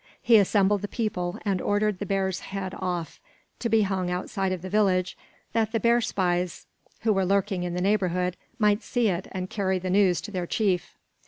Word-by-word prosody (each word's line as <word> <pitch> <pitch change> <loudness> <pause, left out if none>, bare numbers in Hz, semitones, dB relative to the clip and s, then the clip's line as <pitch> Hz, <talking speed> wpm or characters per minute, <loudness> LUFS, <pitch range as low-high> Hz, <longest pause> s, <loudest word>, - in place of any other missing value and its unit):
He 235 -2 +5
assembled 200 0 +3
the 205 - -3
people 200 -6 -2
and 195 -3 0
ordered 205 -1 +1
the 205 - -4
bear's 190 -1 0
head 190 -1 -5
off, 175 -4 -3 0.4
to 235 - -1
be 220 -1 +4
hung 190 -2 -1
outside 185 +1 -2
of 185 -2 -3
the - - -4
village, 190 -3 +2 0.4
that 220 -1 +1
the 225 - +2
bear 235 +3 +3
spies, 180 -5 -1 0.4
who 220 -1 +2
were 195 -1 +1
lurking 195 0 +1
in 175 0 -3
the 180 - -1
neighborhood, 180 -2 +1 0.2
might 210 -1 +3
see 240 -3 +1
it 180 0 -2
and 185 -1 -4
carry 190 -2 0
the 185 0 -3
news 190 -2 +4
to 210 - -8
their 180 -3 -3
chief. 190 -4 0
195 Hz, 195 wpm, -26 LUFS, 180-210 Hz, 0.4 s, He